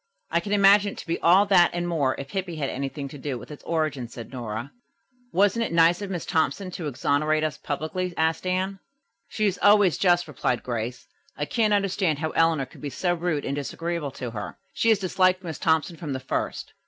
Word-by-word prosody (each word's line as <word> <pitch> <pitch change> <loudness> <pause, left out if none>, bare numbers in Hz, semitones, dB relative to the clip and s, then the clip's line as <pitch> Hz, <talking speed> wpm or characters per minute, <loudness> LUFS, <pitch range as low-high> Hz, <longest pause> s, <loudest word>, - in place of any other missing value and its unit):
'" - - -42
"I - - +5
can 200 +4 -6
imagine 200 0 +5
it - - -15
to - - -8
be 165 - -2
all 185 +4 +5
that 185 -4 +5
and 175 0 -1
more 145 -6 0
if 140 +1 -7
Hippy 185 -2 -3
had 145 -3 -2
anything 140 +1 -4
to 145 - -10
do 135 -2 -3
with 120 - -11
its 150 - -10
origin," 155 -7 -1
said 115 0 -10
Nora. 120 0 -5 0.6
"Wasn't 205 +5 +3
it - - -3
nice 170 +2 +4
of 200 - -4
Miss 180 -3 -4
Thompson 185 +4 0
to 170 -3 -5
exonerate 150 +3 +1
us 155 -1 -2
publicly?" 160 +5 -3
asked 160 +3 0
Anne. 190 +1 -1 0.5
"She 215 - -1
is 195 -2 0
always 205 -4 +5
just," 175 -2 +3
replied 125 -4 -1
Grace. 120 0 -4 0.3
"I 145 - -1
can't 220 +4 +1
understand 195 -5 +1
how 155 +1 -2
Eleanor 165 -4 +2
could 130 - -16
be 145 - -4
so 175 +5 0
rude 165 -4 -1
and 140 - -2
disagreeable 165 +2 -3
to 125 -2 -5
her. 105 -2 -6 0.2
She 230 - +1
has 220 - +5
disliked 185 -1 +2
Miss 160 -5 -6
Thompson 160 +1 +1
from 150 -3 -4
the 130 - -3
first." 130 - -3
165 Hz, 215 wpm, -25 LUFS, 145-185 Hz, 0.6 s, I